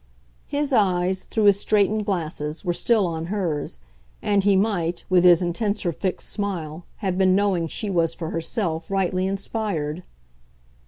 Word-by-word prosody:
His 285 -1 -1
eyes, 185 -3 +2
through 220 - -1
his 200 -1 +5
straightened 210 +1 +1
glasses, 160 -3 -3
were 175 - +1
still 220 +2 +2
on 165 -1 -3
hers, 170 - -2 0.4
and 205 -1 +1
he 200 0 +4
might, 185 -4 0
with 180 -1 +5
his 180 -1 +6
intenser 200 +1 -1
fixed 185 +3 -3
smile, 175 -6 -4 0.2
have 185 -1 0
been 185 -1 +4
knowing 190 -4 +1
she 205 +5 -4
was, 165 -3 +2
for 165 -2 -5
herself, 165 -1 -2
rightly 185 -1 0
inspired. 195 -5 -3
185 Hz, 150 wpm, -23 LUFS, 170-205 Hz, 0.4 s, his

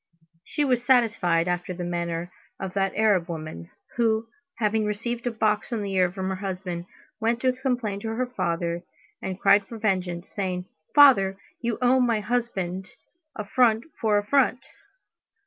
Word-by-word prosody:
She 295 - -1
was 250 -3 +1
satisfied 215 -10 +3
after 180 +1 -2
the 175 - -5
manner 170 0 -3 0.3
of 190 -1 -4
that 195 -1 0
Arab 200 -6 +3
woman, 155 - -6 0.3
who, 225 -1 +2 0.3
having 220 -1 +1
received 230 +3 -3
a - - +1
box 215 -1 0
on 225 -3 -1
the 200 -1 -3
ear 185 -2 +3
from 190 0 -3
her 190 - -2
husband, 185 -3 -4 0.3
went 230 +2 0
to 255 -1 +3
complain 245 -6 -2
to 225 - -6
her 225 +3 -1
father, 170 -8 -2 0.4
and 190 0 -4
cried 200 0 +5
for 230 - -8
vengeance, 185 -5 -1
saying: 185 -3 -3 0.3
"Father, 200 -10 +7 0.2
you 235 -2 -1
owe 255 +1 +5
my 235 -3 +2
husband 200 -5 -2 0.5
affront 220 +2 +2 0.2
for 215 -2 +3
affront." 255 +4 +2
205 Hz, 155 wpm, -25 LUFS, 180-235 Hz, 0.5 s, Father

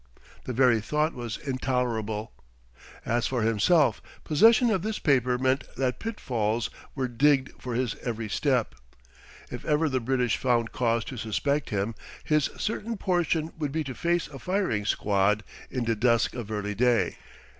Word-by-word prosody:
The - - -3
very 120 -2 +4
thought 150 +7 0
was 120 -3 -5
intolerable.... 120 -5 -2 0.7
As 120 +1 +1
for 125 -4 -1
himself, 115 - +3 0.2
possession 225 - +5
of 190 -5 +1
this 215 +2 -2
paper 130 -4 +2
meant 130 +2 +1
that 130 -1 -1
pitfalls 120 - -2 0.2
were 130 -2 -1
digged 135 +2 +2
for 125 -2 -4
his 125 -3 0
every 115 -2 -3
step. 85 -9 0 0.8
If - - -6
ever 155 +1 +2
the 130 -2 0
British 125 -2 0
found 120 -3 +1
cause 115 -2 0
to 130 - -7
suspect 140 +7 -1
him, 100 +2 -1 0.3
his 150 -2 +2
certain 225 +1 -3
portion 170 -4 0
would 150 -3 -2
be 160 +2 -1
to 135 -3 -5
face 170 +4 0
a 140 -2 -9
firing 180 - -1
squad 105 0 +1 0.3
in 125 -2 -2
dusk 115 -1 +2
of 120 -4 -6
early 105 -1 -2
day. 120 +2 +2
125 Hz, 155 wpm, -27 LUFS, 115-150 Hz, 0.8 s, possession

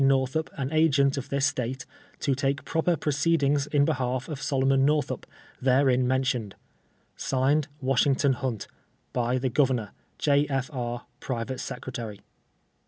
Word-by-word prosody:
Northup 135 +3 +1
an 135 +1 -4
Agent 140 -3 +4
of 135 -2 -5
this 140 0 +1
State, 130 -2 -2 0.4
to 140 - +2
take 135 +1 -1
proper 165 +2 +1
proceedings 145 -1 +1
in 145 -1 +3
behalf 130 -4 -1
of 150 -2 -5
Solomon 135 -1 +2
Northup, 150 +1 0 0.3
there 130 +1 +4
in 125 0 +2
nienlioued. 130 -5 0 0.6
(Signed,) 140 +3 +1
WASHINGTON 135 +1 +3
HUNT. 120 -4 -3 0.5
By 125 +1 +1
the 130 0 0
Governor. 125 -5 +1 0.3
J. 145 0 +3
F. 135 0 -1
IJ., 120 -3 -4 0.2
Private 125 0 -3
Secretary. 120 -5 -6
135 Hz, 135 wpm, -27 LUFS, 125-140 Hz, 0.6 s, Agent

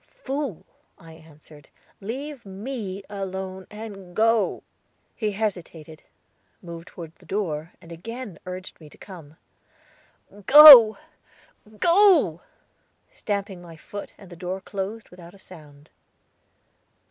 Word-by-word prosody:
"Fool," 280 - -6 0.3
I 165 -1 -15
answered; 155 -2 -18 0.3
"leave 265 +6 -7
me 200 -1 -7
alone, 190 -1 -7
and 205 -4 -11
go." 225 -2 +1 0.5
He 215 -3 -3
hesitated, 170 -7 -6 0.6
moved 170 -1 -11
toward 165 -2 -11
the - - -21
door, 170 -5 -4
and 170 - -16
again 220 +3 -9
urged 185 -1 -9
me 155 - -14
to - - -19
come. 160 -6 -13 1.1
"Go! 275 -7 +10 0.8
go!" 340 - +4 0.7
stamping 200 -3 -5
my 165 -2 -13
foot, 205 +5 -10
and 195 -3 -16
the - - -10
door 180 +2 -6
closed 200 +3 -7
without 175 0 -14
a - - -17
sound. 150 -6 -15
190 Hz, 110 wpm, -23 LUFS, 170-220 Hz, 1.1 s, Go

